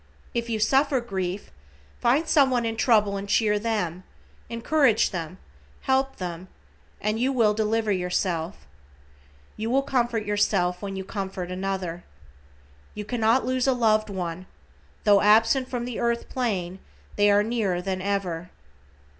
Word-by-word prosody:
If 235 Hz, 0 st, -2 dB
you 225 Hz, -, 0 dB
suffer 270 Hz, +4 st, +3 dB
grief, 190 Hz, -4 st, -4 dB, 0.5 s
find 280 Hz, +7 st, +2 dB
someone 265 Hz, -6 st, +3 dB
in 225 Hz, 0 st, -2 dB
trouble 210 Hz, -3 st, +3 dB
and 200 Hz, +1 st, -6 dB
cheer 210 Hz, -1 st, +2 dB
them, 205 Hz, -6 st, -2 dB, 0.5 s
encourage 240 Hz, +1 st, +2 dB
them, 170 Hz, -1 st, -5 dB, 0.4 s
help 265 Hz, 0 st, +1 dB
them, 180 Hz, 0 st, -6 dB, 0.5 s
and 215 Hz, +2 st, -1 dB
you 260 Hz, +3 st, +2 dB
will 225 Hz, -5 st, +3 dB
deliver 220 Hz, 0 st, 0 dB
yourself. 180 Hz, -2 st, -2 dB, 0.9 s
You 220 Hz, +1 st, -3 dB
will 270 Hz, +3 st, +2 dB
comfort 240 Hz, -5 st, 0 dB
yourself 195 Hz, -3 st, +1 dB
when 195 Hz, -1 st, -5 dB
you 190 Hz, -, -4 dB
comfort 190 Hz, -2 st, -5 dB
another. 185 Hz, -2 st, -3 dB, 0.9 s
You 210 Hz, 0 st, -5 dB
cannot 230 Hz, +2 st, +2 dB
lose 255 Hz, 0 st, 0 dB
a 265 Hz, -, +4 dB
loved 215 Hz, -3 st, +2 dB
one, 180 Hz, -2 st, -5 dB, 0.6 s
tho 205 Hz, -1 st, +5 dB
absent 225 Hz, +5 st, +4 dB
from 245 Hz, -2 st, -3 dB
the 245 Hz, -2 st, -5 dB
earth 235 Hz, 0 st, -1 dB
plane 190 Hz, -8 st, -2 dB, 0.4 s
they 205 Hz, 0 st, +4 dB
are 205 Hz, 0 st, +4 dB
nearer 210 Hz, -5 st, -1 dB
than 185 Hz, 0 st, -3 dB
ever. 185 Hz, -3 st, -2 dB
210 Hz, 140 wpm, -25 LUFS, 190-235 Hz, 0.9 s, tho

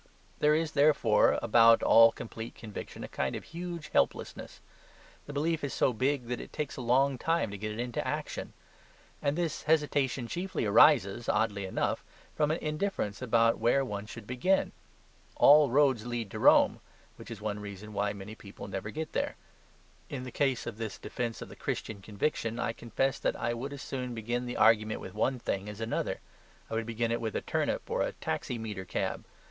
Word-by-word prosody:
There 150 Hz, 0 st, +4 dB
is, 160 Hz, 0 st, 0 dB
therefore, 140 Hz, -8 st, +4 dB
about 115 Hz, 0 st, +6 dB
all 115 Hz, 0 st, +7 dB
complete 115 Hz, 0 st, -8 dB
conviction 110 Hz, -3 st, -8 dB
a -, -, -5 dB
kind 65 Hz, -, -2 dB
of -, -, -6 dB
huge 170 Hz, -2 st, -6 dB
helplessness. -, -, -1 dB, 0.7 s
The -, -, -6 dB
belief 155 Hz, +3 st, -1 dB
is 140 Hz, -, -3 dB
so 130 Hz, -, +2 dB
big 130 Hz, +3 st, 0 dB
that 120 Hz, 0 st, -3 dB
it -, -, -10 dB
takes 150 Hz, -3 st, -4 dB
a -, -, -6 dB
long 130 Hz, +2 st, +2 dB
time 165 Hz, -8 st, 0 dB
to 100 Hz, -, -6 dB
get 110 Hz, +1 st, -3 dB
it 105 Hz, -, -6 dB
into 120 Hz, -1 st, -2 dB
action. -, -, -4 dB, 0.7 s
And 140 Hz, +2 st, 0 dB
this 170 Hz, -3 st, -1 dB
hesitation 145 Hz, -5 st, +1 dB
chiefly 180 Hz, -1 st, -3 dB
arises, 115 Hz, -1 st, +5 dB
oddly 105 Hz, -2 st, +1 dB
enough, -, -, -1 dB, 0.3 s
from 150 Hz, -1 st, +2 dB
an 155 Hz, -, +1 dB
indifference 150 Hz, -, -2 dB
about 115 Hz, -2 st, +3 dB
where 120 Hz, +4 st, +3 dB
one 105 Hz, -3 st, -5 dB
should 115 Hz, -1 st, -9 dB
begin. 130 Hz, -, +1 dB, 0.6 s
All 145 Hz, -1 st, +7 dB
roads 135 Hz, -3 st, +3 dB
lead 120 Hz, -4 st, -3 dB
to -, -, -5 dB
Rome; -, -, +5 dB, 0.4 s
which -, -, -11 dB
is 115 Hz, -4 st, -7 dB
one 105 Hz, -1 st, -3 dB
reason 105 Hz, +1 st, -8 dB
why 100 Hz, 0 st, 0 dB
many 100 Hz, +1 st, -8 dB
people 100 Hz, -2 st, -10 dB
never 100 Hz, +1 st, -4 dB
get 155 Hz, +6 st, -5 dB
there. -, -, -1 dB, 0.7 s
In 130 Hz, -3 st, -5 dB
the 125 Hz, -, -7 dB
case 135 Hz, -2 st, 0 dB
of 115 Hz, -2 st, -6 dB
this 110 Hz, -3 st, -4 dB
defence 120 Hz, -2 st, -4 dB
of -, -, -10 dB
the -, -, -12 dB
Christian 100 Hz, -2 st, -4 dB
conviction 110 Hz, +2 st, -2 dB
I 120 Hz, -, -1 dB
confess 130 Hz, +3 st, -1 dB
that -, -, 0 dB
I 120 Hz, -, -1 dB
would 130 Hz, +4 st, -5 dB
as 140 Hz, -1 st, -7 dB
soon 125 Hz, -2 st, -4 dB
begin 120 Hz, +2 st, -2 dB
the 120 Hz, -, -4 dB
argument 110 Hz, -1 st, +4 dB
with -, -, -8 dB
one 125 Hz, +5 st, 0 dB
thing 100 Hz, -4 st, -3 dB
as 105 Hz, 0 st, -8 dB
another; 115 Hz, +1 st, -2 dB, 0.5 s
I -, -, -3 dB
would 115 Hz, 0 st, -1 dB
begin 115 Hz, 0 st, -1 dB
it 115 Hz, 0 st, -1 dB
with 110 Hz, -3 st, -3 dB
a -, -, 0 dB
turnip -, -, -1 dB
or -, -, -1 dB
a -, -, -1 dB
taximeter 110 Hz, -5 st, -4 dB
cab. -, -, -3 dB
120 Hz, 190 wpm, -30 LUFS, 110-140 Hz, 0.7 s, all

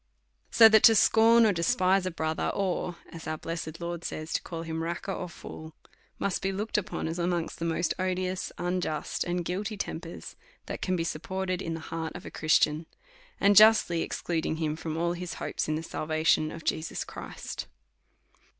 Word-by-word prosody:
So 225 Hz, -, +9 dB
that 220 Hz, -1 st, +6 dB
to 225 Hz, -, +8 dB
scorn 225 Hz, +2 st, +6 dB
or 210 Hz, -, +4 dB
despise 185 Hz, +2 st, +2 dB
a -, -, +1 dB
brother, 160 Hz, -2 st, -2 dB
or, 180 Hz, -2 st, -1 dB
as 165 Hz, -1 st, -9 dB
our 155 Hz, 0 st, -2 dB
blessed 165 Hz, 0 st, -5 dB
Lord 170 Hz, 0 st, -4 dB
says, 155 Hz, +1 st, -5 dB
to -, -, +1 dB
call 165 Hz, -1 st, -6 dB
him 160 Hz, 0 st, -4 dB
Raca 170 Hz, +4 st, -3 dB
or 180 Hz, -, -5 dB
Fool, 160 Hz, -1 st, -10 dB, 0.4 s
must 200 Hz, -, -1 dB
be 195 Hz, -, 0 dB
looked 210 Hz, +3 st, -2 dB
upoj3, 200 Hz, -5 st, -2 dB
as 165 Hz, +2 st, -4 dB
amongst 175 Hz, -1 st, -1 dB
the 165 Hz, -, -2 dB
most 165 Hz, 0 st, 0 dB
odious, 185 Hz, 0 st, -1 dB
unjust, 175 Hz, -3 st, -2 dB
and 175 Hz, 0 st, -2 dB
guilty 200 Hz, +4 st, -3 dB
tempers, 165 Hz, -3 st, -6 dB, 0.3 s
that -, -, -6 dB
can 185 Hz, -, 0 dB
be 165 Hz, -, 0 dB
support 185 Hz, +4 st, -3 dB
ed 185 Hz, 0 st, -1 dB
in 165 Hz, -2 st, -3 dB
the -, -, -5 dB
heart 160 Hz, 0 st, -5 dB
of 180 Hz, -, -8 dB
a -, -, -7 dB
Christian, 155 Hz, 0 st, +2 dB, 0.5 s
and 200 Hz, +1 st, +5 dB
justly 215 Hz, -5 st, +6 dB
excluding 165 Hz, -2 st, -2 dB
him 155 Hz, -1 st, -1 dB
from 160 Hz, 0 st, -4 dB
all 170 Hz, +1 st, +1 dB
his 175 Hz, 0 st, -5 dB
hopes -, -, -3 dB
in 155 Hz, -, 0 dB
the 160 Hz, -, -3 dB
salvation 155 Hz, -1 st, +1 dB
of 165 Hz, -, -8 dB
Jesus 160 Hz, 0 st, -2 dB
Christ. -, -, -7 dB
170 Hz, 185 wpm, -28 LUFS, 160-185 Hz, 0.5 s, So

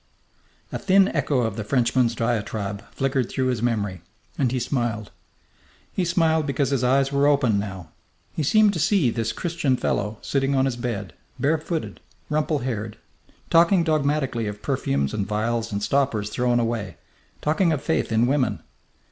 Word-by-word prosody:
A -, -, -3 dB
thin 195 Hz, +1 st, +4 dB
echo 135 Hz, -4 st, 0 dB
of 110 Hz, -3 st, -2 dB
the 110 Hz, -, -2 dB
Frenchman's 120 Hz, 0 st, +1 dB
diatribe 110 Hz, -3 st, -2 dB
flickered 135 Hz, -2 st, -1 dB
through 130 Hz, -1 st, 0 dB
his 125 Hz, -4 st, -1 dB
memory, 105 Hz, -7 st, -1 dB, 0.3 s
and 130 Hz, -4 st, +1 dB
he 130 Hz, -, 0 dB
smiled. 120 Hz, -4 st, -2 dB, 0.8 s
He 185 Hz, -, 0 dB
smiled 160 Hz, -3 st, +2 dB
because 140 Hz, -1 st, 0 dB
his 135 Hz, -3 st, +1 dB
eyes 135 Hz, +2 st, +3 dB
were 140 Hz, 0 st, +3 dB
open 130 Hz, -8 st, +3 dB
now. 95 Hz, -5 st, -6 dB, 0.4 s
He -, -, -2 dB
seemed 210 Hz, +7 st, +4 dB
to 170 Hz, -, -3 dB
see 160 Hz, -, +3 dB
this 115 Hz, -1 st, -1 dB
Christian 150 Hz, -1 st, -1 dB
fellow 105 Hz, -1 st, -1 dB
sitting 135 Hz, 0 st, 0 dB
on 135 Hz, 0 st, +3 dB
his 135 Hz, -3 st, -1 dB
bed, 115 Hz, -5 st, -4 dB, 0.2 s
bare 155 Hz, +3 st, +1 dB
footed, 160 Hz, +1 st, -4 dB, 0.3 s
rumple 155 Hz, 0 st, +1 dB
haired, 110 Hz, -4 st, -4 dB, 0.5 s
talking 170 Hz, +2 st, +5 dB
dogmatically 140 Hz, -7 st, 0 dB
of 105 Hz, 0 st, -6 dB
perfumes 70 Hz, 0 st, -1 dB
and 100 Hz, -2 st, -2 dB
vials 115 Hz, +2 st, -1 dB
and 100 Hz, 0 st, -2 dB
stoppers 115 Hz, -5 st, 0 dB
thrown 120 Hz, -1 st, +1 dB
away, 110 Hz, -7 st, -2 dB, 0.4 s
talking 165 Hz, +3 st, +2 dB
of 150 Hz, -3 st, -1 dB
faith 160 Hz, -, 0 dB
in 110 Hz, +1 st, +3 dB
women. 130 Hz, 0 st, 0 dB
125 Hz, 165 wpm, -24 LUFS, 110-145 Hz, 0.8 s, talking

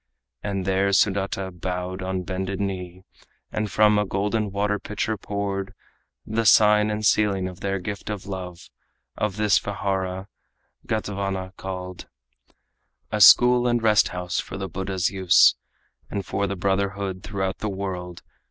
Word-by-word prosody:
And 100 Hz, -2 st, -3 dB
there 95 Hz, +1 st, +2 dB
Sudata 95 Hz, -1 st, +1 dB
bowed 90 Hz, +1 st, -4 dB
on 95 Hz, 0 st, -2 dB
bended 95 Hz, +1 st, -4 dB
knee, 95 Hz, -2 st, -4 dB, 0.5 s
And 105 Hz, -1 st, -2 dB
from 105 Hz, 0 st, +4 dB
a 105 Hz, -, +1 dB
golden 105 Hz, +3 st, 0 dB
pitcher 105 Hz, +2 st, -2 dB
water -, -, -5 dB
poured, 100 Hz, -1 st, -3 dB, 0.5 s
The 110 Hz, +1 st, -1 dB
sign 105 Hz, 0 st, +5 dB
and 105 Hz, 0 st, -2 dB
sealing 100 Hz, -3 st, +2 dB
of 90 Hz, 0 st, -9 dB
their 100 Hz, 0 st, -1 dB
gift 100 Hz, +3 st, -6 dB
of 105 Hz, -3 st, -5 dB
love 90 Hz, -3 st, -7 dB, 0.4 s
Of 105 Hz, -2 st, -2 dB
this 105 Hz, -1 st, +3 dB
vihara, 95 Hz, -1 st, -3 dB, 0.6 s
Gatavana 100 Hz, -3 st, -3 dB
called, 90 Hz, -1 st, -7 dB, 1.0 s
A 105 Hz, -1 st, -1 dB
school 125 Hz, +3 st, +7 dB
and 120 Hz, 0 st, +2 dB
rest 105 Hz, -2 st, +5 dB
house 90 Hz, -1 st, -3 dB
for -, -, -5 dB
the 95 Hz, 0 st, -4 dB
Buddha's 95 Hz, -1 st, -2 dB
use, 95 Hz, -2 st, +5 dB, 0.6 s
And 100 Hz, -2 st, -4 dB
for 100 Hz, +1 st, -1 dB
the 100 Hz, -, -3 dB
brotherhood 95 Hz, 0 st, -1 dB
throughout 95 Hz, -1 st, -3 dB
the 105 Hz, -, -2 dB
world. 90 Hz, -3 st, -5 dB
95 Hz, 145 wpm, -24 LUFS, 95-105 Hz, 1.0 s, school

